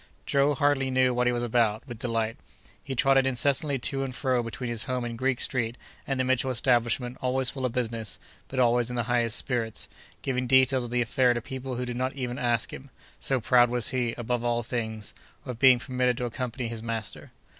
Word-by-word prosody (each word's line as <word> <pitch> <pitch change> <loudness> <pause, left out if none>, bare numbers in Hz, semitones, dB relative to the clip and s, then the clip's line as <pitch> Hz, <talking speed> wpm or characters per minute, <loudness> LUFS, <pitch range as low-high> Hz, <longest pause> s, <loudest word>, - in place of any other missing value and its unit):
Joe 140 +1 +2
hardly 145 -2 +2
knew 130 -1 +3
what 125 0 +1
he - - +4
was 120 0 -1
about, 115 -1 +1
with 120 -4 -7
delight. 115 -2 -1 0.5
He 135 - -4
trotted 135 +1 +4
incessantly 140 +3 +2
to 135 +2 -2
and 130 -2 -5
fro 130 -2 +1
between 120 +1 -5
his 115 -1 -2
home 125 -2 -2
in 115 -1 -4
Greek 130 +1 0
Street, 120 -2 -1 0.3
and 135 -2 -1
the - - +3
Mitchell 130 0 +1
establishment, 120 0 +1
always 130 0 +1
full 130 -2 -2
of 120 - -7
business, 115 -4 -2 0.3
but 130 - -4
always 120 -1 +3
in 125 - -4
the 120 - 0
highest 120 -1 +1
spirits, 115 -4 -1 0.4
giving 130 -1 -1
details 130 0 +4
of - - -7
the 120 0 +1
affair 125 +1 +2
to 120 - -2
people 130 +1 -5
who 125 +1 -2
did 120 -1 -4
not 130 +1 -1
even 125 -2 -3
ask 120 -2 0
him, 135 +1 -9 0.3
so 135 -1 0
proud 120 +1 +4
was 120 -2 0
he, 125 -3 0
above 120 0 -2
all 120 0 0
things, 110 -2 -3 0.3
of 125 -3 -6
being 130 -1 +7
permitted 125 -1 0
to 125 - -2
accompany 120 0 -4
his 115 -1 -5
master. 115 -1 -5
125 Hz, 210 wpm, -27 LUFS, 120-130 Hz, 0.5 s, being